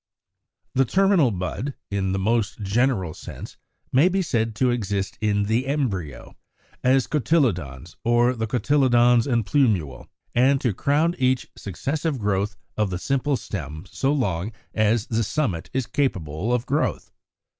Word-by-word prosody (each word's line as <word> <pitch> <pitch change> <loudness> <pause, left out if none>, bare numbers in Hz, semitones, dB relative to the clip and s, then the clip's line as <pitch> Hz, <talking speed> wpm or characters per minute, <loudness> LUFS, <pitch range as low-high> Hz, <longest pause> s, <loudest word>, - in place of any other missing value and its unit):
=The 135 - +4
Terminal 190 - +3
Bud=, 105 +8 -4 0.2
in 95 -1 0
the 95 - 0
most 110 +1 0
general 100 -4 +1
sense, - - -10 0.4
may 145 +8 +5
be 190 +1 0
said 115 -8 -1
to 125 +4 +2
exist 100 -3 -2
in 105 -1 +1
the 115 +5 0
embryo, 100 - -3 0.5
as 130 0 +4
cotyledons, 115 - 0
or 120 +1 +3
the 115 -2 -3
cotyledons 120 0 +3
and 120 -5 +1
plumule, 100 - +1 0.3
and 135 +3 +4
to 120 -6 0
crown 150 - +1
each 130 0 +1
successive 140 - -3
growth 105 -1 -1 0.2
of 105 -2 0
the 90 - -3
simple 135 +6 0
stem 80 - -6
so 135 - 0
long 105 - -1 0.2
as 110 0 +2
the 115 0 0
summit 105 - -2
is 130 -2 -1
capable 95 - -1
of 125 0 0
growth. 145 +3 -1
120 Hz, 145 wpm, -24 LUFS, 100-135 Hz, 0.5 s, may